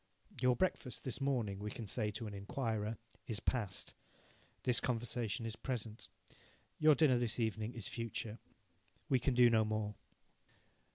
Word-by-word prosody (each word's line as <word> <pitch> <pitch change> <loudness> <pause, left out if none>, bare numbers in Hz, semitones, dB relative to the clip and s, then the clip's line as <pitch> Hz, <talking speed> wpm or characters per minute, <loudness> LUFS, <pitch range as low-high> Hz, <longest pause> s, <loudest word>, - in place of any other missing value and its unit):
"Your 125 -1 +5
breakfast 155 -7 0
this 130 +1 -2
morning," 120 -8 0
we 105 +1 -3
can 110 +2 -6
say 105 +1 +1
to 110 +2 -4
an 105 - -5
inquirer, 110 +1 -2 0.3
"is 110 -4 -1
past; 110 -6 -1 0.7
this 125 -2 +4
conversation 115 -2 -1
is 115 -1 -3
present; 115 -3 -3 0.7
your 155 -1 +7
dinner 140 -6 +5
this 120 -1 0
evening 110 +1 -1
is 115 -5 -3
future." 115 -1 -3 0.7
We 130 - +4
can 125 +1 +1
do 125 0 +8
no 110 -2 +5
more. 110 -1 -1
115 Hz, 150 wpm, -37 LUFS, 110-125 Hz, 0.7 s, do